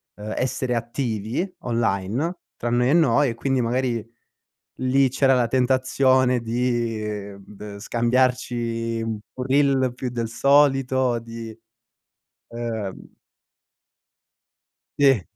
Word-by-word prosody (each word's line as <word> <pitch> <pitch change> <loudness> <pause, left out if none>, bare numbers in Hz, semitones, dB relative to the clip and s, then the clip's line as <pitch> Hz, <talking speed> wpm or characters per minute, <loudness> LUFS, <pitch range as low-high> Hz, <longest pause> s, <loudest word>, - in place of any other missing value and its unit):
uhm, 105 +1 -6
essere 130 -1 -1
attivi 120 - -3
online, 115 - -1 0.2
tra 120 - -3
noi 125 +1 +2
e - - +4
noi 145 -4 +4
e 115 - -4
quindi 135 +2 0
magari 120 -1 -1 0.8
lì 130 +1 +3
c'era 135 +1 +3
la 125 -2 +2
tentazione 130 0 +2
di 115 -4 -2
b 100 +1 -10
scambiarci 120 0 0
un 110 -1 -3 0.3
reel 135 -2 +3
più 125 0 -4
del 115 -2 -3
solito 135 -2 +3
di, 115 -1 -8 0.9
ehm 115 -4 -4 2.0
Sì. 135 -7 +5
120 Hz, 100 wpm, -23 LUFS, 115-130 Hz, 2.0 s, Sì